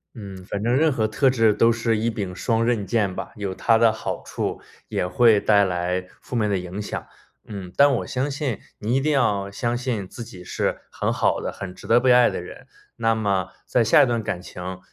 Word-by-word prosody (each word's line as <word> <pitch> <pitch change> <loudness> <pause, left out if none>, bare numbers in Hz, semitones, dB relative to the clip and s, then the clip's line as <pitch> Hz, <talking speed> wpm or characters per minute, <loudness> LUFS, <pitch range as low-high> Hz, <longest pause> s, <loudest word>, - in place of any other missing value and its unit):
嗯， 100 -4 -8
反 100 +1 -4
正 120 +2 +2
任 155 +3 +3
何 110 -5 0
特 130 +5 +2
质 115 -4 +3
都 115 +3 +4
是 115 -1 0
一 115 +2 0
柄 100 -5 -4
双 115 +1 0
刃 115 -4 0
剑 100 -4 0
吧， - - -6
有 100 -3 -4
它 115 +4 +3
的 115 -1 +4
好 - - -5
处， - - -3 0.3
也 90 - -1
会 115 +1 +5
带 100 0 +4
来 90 0 -1
负 125 - -8
面 105 -2 +1
的 100 - +1
影 90 +3 -5
响。 - - -5 0.4
嗯， 95 -4 -7
但 140 0 +6
我 - - -4
相 130 +3 -1
信 135 -6 -3 0.2
你 115 +5 -1
一 - - +3
定 155 +2 +1
要 105 -8 +1
相 120 +3 -1
信 120 -6 -3
自 120 - -8
己 95 -6 -11
是 - - -2
很 - - -1
好 - - +1
的、 - - -3
很 90 -2 -8
值 - - -13
得 120 +1 +5
被 125 0 +3
爱 125 0 +6
的 - - -4
人。 - - -11 0.3
那 115 -1 +2
么 100 -4 0 0.2
在 120 - +3
下 110 - +6
一 135 - +2
段 115 -2 -1
感 90 -3 -3
情 90 +1 -7
110 Hz, 245 characters per minute, -23 LUFS, 100-120 Hz, 0.4 s, 但